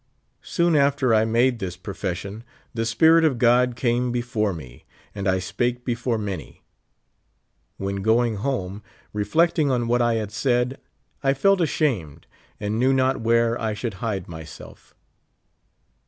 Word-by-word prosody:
Soon 170 -2 +1
after 140 -3 +3
I 110 0 +4
made 120 +2 +2
this 90 -3 -5
profession 95 +3 -5 0.3
the 115 -1 -2
Spirit 160 +9 +5
of 150 -6 +2
God 125 +1 +3
came 120 0 0
before 120 -4 -1
me, 65 -8 -10 0.3
and 100 -1 -4
I 95 0 +3
spake 120 +6 -2
before 120 -1 -1
many. 95 - -6 1.2
AVlien 100 0 -3
going 115 +2 +2
home, 100 -5 -3 0.3
reflecting 155 - +2
on 120 -3 0
what 120 +1 +2
I 120 -1 +2
had 110 -2 -3
said, 125 +3 0 0.4
I 135 0 +2
felt 195 +7 +3
ashamed, 130 - -1 0.3
and 105 +2 -2
knew 130 +2 +3
not 130 -1 +1
where 115 +1 +2
I 110 -1 -1
should 110 +1 -4
hide 100 -6 -2
myself. 80 -2 -11
115 Hz, 140 wpm, -23 LUFS, 105-130 Hz, 1.2 s, Spirit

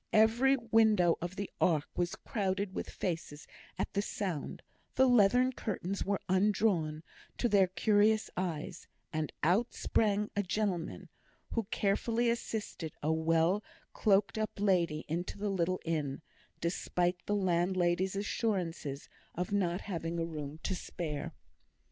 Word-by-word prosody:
Every 235 +5 +5
window 220 -7 +4
of 175 +2 -4
the 200 0 -3
ark 155 -5 +3
was 175 0 -1
crowded 195 -2 -2
with - - -4
faces 165 -5 -4 0.3
at - - -2
the 200 - +1
sound; 190 -7 -4 0.3
the 265 - +5
leathern 245 +2 +5
curtains 200 -4 -3
were 200 -1 0
undrawn 185 -5 +2 0.3
to 240 - +2
their 200 -4 +5
curious 210 +4 +3
eyes, 170 -2 -4 0.3
and 155 -1 -1
out 195 +10 +2
sprang 210 -1 +1
a 205 - +2
gentleman, 190 -3 -2 0.4
who 230 -3 -1
carefully 230 +4 +1
assisted 215 -8 -4
a 155 +2 +2
well 165 +5 +2 0.3
cloaked 200 +1 +2
up 215 0 0
lady 175 -6 +2
into 170 +5 -3
the 205 0 -1
little 185 -1 0
inn, 155 -3 -2 0.4
despite 175 +1 0
the 205 - +1
landlady's 185 0 +1
assurances 180 - -2 0.3
of 180 +2 -2
not 185 -3 +1
having 170 -3 -3
a 165 - 0
room 150 -2 -6
to - - -1
spare. 160 -5 -4
185 Hz, 135 wpm, -32 LUFS, 170-210 Hz, 0.4 s, Every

